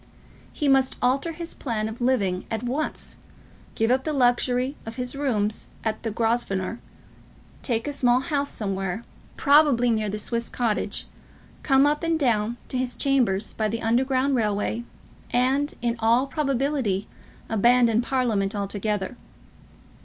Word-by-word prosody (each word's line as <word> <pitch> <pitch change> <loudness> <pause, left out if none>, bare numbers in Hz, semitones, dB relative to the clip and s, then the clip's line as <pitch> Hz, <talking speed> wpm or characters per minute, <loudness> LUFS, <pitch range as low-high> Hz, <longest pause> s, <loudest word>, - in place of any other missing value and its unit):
He 295 - -2
must 270 -1 +3
alter 270 +6 +1
his 335 +1 -6
plan 220 -5 -2
of 220 +3 -7
living 200 -8 +1
at 225 0 -3
once, 270 +6 -3 0.6
give 225 +2 +1
up 260 +1 +2
the 310 - -2
luxury 250 +1 +2
of 225 0 -7
his 250 +1 -3
rooms 220 -7 -1 0.2
at 220 -1 -2
the 225 - -2
Grosvenor, 225 -2 -1 0.8
take 230 0 -1
a 290 - -2
small 250 -3 +3
house 280 0 -1
somewhere, 195 0 -2 0.3
probably 280 -5 +5
near 215 -2 0
the 210 - -3
Swiss 230 +2 -2
Cottage, 230 -4 -1 0.6
come 270 -1 +4
up 295 +1 +1
and 330 -1 +1
down 235 -5 +1
to 255 - -1
his 250 -1 -1
chambers 235 -7 +1
by 220 - 0
the 230 +2 -3
underground 260 +4 +2
railway, 220 0 0 0.4
and, 265 +4 +1
in 235 -1 +1
all 230 +3 +3
probability, 275 -7 -1 0.4
abandon 235 +1 +4
Parliament 235 -6 0
altogether. 205 +1 -2
240 Hz, 140 wpm, -25 LUFS, 220-270 Hz, 0.8 s, probably